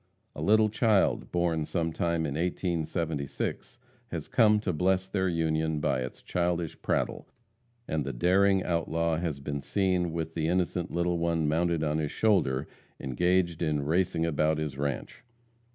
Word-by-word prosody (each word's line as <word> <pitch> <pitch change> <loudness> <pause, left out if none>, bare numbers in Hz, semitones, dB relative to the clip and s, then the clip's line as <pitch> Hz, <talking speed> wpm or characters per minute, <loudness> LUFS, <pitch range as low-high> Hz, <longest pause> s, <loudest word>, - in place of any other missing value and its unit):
A - - -6
little 110 +1 +4
child, 110 -2 +2
born 85 -2 +1
sometime 85 0 -1
in 70 - -2
1876, 80 - -2 0.3
has 85 -7 -5
come 105 -2 +4
to 95 -4 -1
bless 95 +3 +1
their 95 -1 0
union 80 -2 0
by 70 - 0
its 65 0 -6
childish 85 -2 -1
prattle, - - -1 0.6
and 80 -1 -1
the 70 - -3
daring 95 +8 +3
outlaw 85 -1 0
has 80 -4 -2
been 70 0 -4
seen 90 -2 0
with 80 -1 -4
the 80 -1 -1
innocent 90 0 0
little 85 0 0
one 85 -2 +1
mounted 85 +1 +1
on 75 0 0
his 75 -2 -2
shoulder 75 -11 +1 0.3
engaged 85 +5 +1
in 75 -3 0
racing 85 +1 +1
about 80 -1 +1
his 75 -3 -3
ranche. 70 - -4
85 Hz, 150 wpm, -28 LUFS, 75-90 Hz, 0.6 s, little